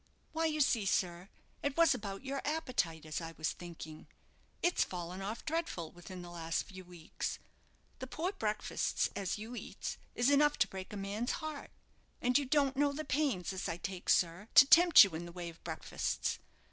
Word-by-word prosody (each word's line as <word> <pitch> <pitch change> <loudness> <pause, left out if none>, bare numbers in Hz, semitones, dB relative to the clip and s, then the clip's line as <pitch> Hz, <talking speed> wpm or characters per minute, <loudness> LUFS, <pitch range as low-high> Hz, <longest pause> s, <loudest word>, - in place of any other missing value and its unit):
"Why 325 +1 0
you 305 -1 0
see, 230 -7 +2
sir, 180 -1 0 0.3
it 285 +1 -2
was 335 -2 +6
about 200 +3 -6
your 275 +1 -2
appetite 255 - -1
as 155 +2 -3
I 165 0 -6
was 160 0 -1
thinking. 160 -3 -9 0.6
It's 350 +1 +3
fallen 180 +1 -6
off 210 +4 -5
dreadful 320 - -2
within 180 +1 -9
the 175 - -9
last 165 -1 -2
few 190 -1 -11
weeks. 175 -2 -5 0.6
The 260 - -5
poor 335 +8 -2
breakfastes 215 - -1
as 195 0 -2
you 220 +4 -7
eats - - -6 0.2
is 245 +4 +3
enough 295 +1 +4
to - - +3
break 190 -1 -8
a 210 - -5
man's 200 +5 -2
heart. 310 -3 -5 0.5
And 250 0 +1
you 285 - +4
don't 275 0 +2
know 290 0 +3
the 310 +2 -4
pains 265 - 0
as 190 - -3
I 165 - -3
take, 185 +1 -5
sir, 175 +4 +2
to 275 - +11
tempt 340 +3 +9
you 200 - 0
in 165 +2 -4
the - - -9
way 175 -1 -6
of 165 - -15
breakfastes. - - -2
205 Hz, 190 wpm, -34 LUFS, 175-285 Hz, 0.6 s, to